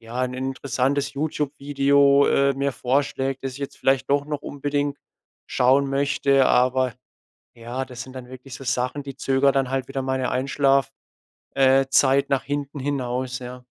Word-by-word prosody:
ja, 115 +3 -6
'n 125 0 -2
interessantes 135 +1 -1
YouTube-Video, 140 -1 +2
äh, 140 0 +2
mir 140 0 -1
vorschlägt, 135 +1 -1
das 135 - -3
ich 130 - -10
jetzt 140 - -6
vielleicht 135 0 +1
doch 140 0 +2
noch 150 -1 -4
unbedingt 145 0 -2 0.5
schauen 135 +3 +3
möchte. 140 0 +2
Aber, 130 0 +2 0.6
ja, 120 +3 -5
das 125 -1 -9
sind 130 - -13
dann 130 -1 -9
wirklich 130 +1 -10
so - - -10
Sachen, 125 +3 -2
die 135 -1 -8
zögere 135 +1 +2
dann 135 -2 0
halt 135 -1 -2
wieder 135 - -3
meine 130 -1 -1
Einschlaf_, 135 +1 +1 0.7
äh, 135 0 +4
Zeit 140 +1 +3
nach 135 -1 +1
hinten 145 0 -4
hinaus, 130 -2 -3
ja. 125 0 -9
135 Hz, 160 wpm, -23 LUFS, 130-140 Hz, 0.7 s, äh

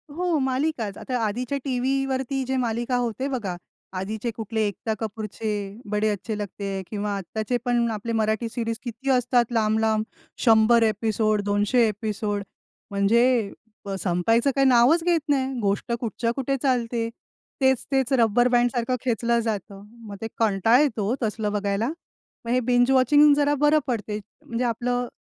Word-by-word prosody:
हो 350 -2 0
मालिकाच. 260 -5 -1
आता 250 -1 -3
आधीच्या 250 +6 -2
टीव्ही 270 +1 0
वरती 265 0 -2
जे 265 - -1
मालिका 240 +1 -1
होते 245 +2 -2
बघा, 210 -9 -3 0.4
आधीचे 215 +5 -3
कुठले, 220 0 -2
एकता 220 +3 -3
कपूरचे 215 0 -4 0.4
'बडे 210 +1 +1
अच्छे 210 +1 -3
लगते 205 0 -6
हैं', 195 -1 -3
किंवा 205 -1 -2
आत्ताचे 215 +6 -2
पण 240 -1 +2
आपले 220 +2 -4
मराठी 220 +1 0
सीरीज 230 -1 -3
किती 260 +3 -5
असतात, 245 -1 +3
लांब-लांब. 220 -1 +1 0.4
100 225 +1 +5
एपिसोड, 215 -1 +1
200 205 +4 +2
एपिसोड, 210 -1 -3 0.5
म्हणजे 200 +4 +3 0.6
अ, 195 -1 -3
संपायचं 225 +9 +2
काही 275 0 +3
नावच 260 +7 +5
घेत 345 -2 +3
नाही. 270 -1 +1
गोष्ट 205 +3 -1
कुठच्या 230 0 -2
कुठे 275 0 -1
चालते. 235 -3 0 0.5
तेच-तेच 265 0 +1
रब्बर 240 0 +4
बँडसारखं 245 0 +1
खेचलं 235 0 +1
जातं. 200 -3 -4 0.3
मग 200 - -7
ते 225 - -3
कंटाळा 225 +3 +3
येतो 225 -8 0
ओ, - - +1
तसलं 210 -1 -1
बघायला. 205 +2 -1 0.6
मग - - -5
हे 255 - +3
बिंज 245 +1 +2
वॉचिंग 290 +3 +6
जरा 290 0 +2
बरं 305 +1 +5
पडते. 215 -3 -2 0.3
म्हणजे 235 +2 -2
आपलं 245 +1 -1
230 Hz, 150 wpm, -24 LUFS, 215-255 Hz, 0.6 s, वॉचिंग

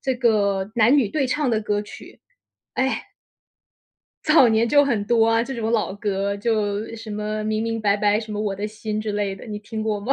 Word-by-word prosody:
这 265 -1 0
个 200 -5 +1
男 235 +4 +5
女 255 -7 +3
对 275 +5 0
唱 290 +2 0
的 225 -3 +1
歌 210 -1 -1
曲。 210 - -12 0.5
哎 265 +1 -1 1.2
早 305 -5 +6
年 225 +1 +2
就 285 +3 +5
很 230 -7 0
多 225 -1 +4
啊， 225 0 +3
这 265 +3 -5
种 225 -2 -2
老 215 -4 0
歌 200 -1 -2
就 210 -1 -1
什 225 -1 -9
么 210 +1 -3
明 215 0 -1
明 225 0 -2
白 205 -1 +2
白 210 0 +2
什 215 -1 -6
么 210 - -3
我 210 -2 -1
的 205 +2 -3
心 215 0 -4
之 215 -1 -3
类 205 -1 -1
的， 195 - -12
你 210 -2 -5
听 215 +1 -6
过 215 -1 -1
吗？ 240 +7 0
215 Hz, 230 characters per minute, -23 LUFS, 205-230 Hz, 1.2 s, 早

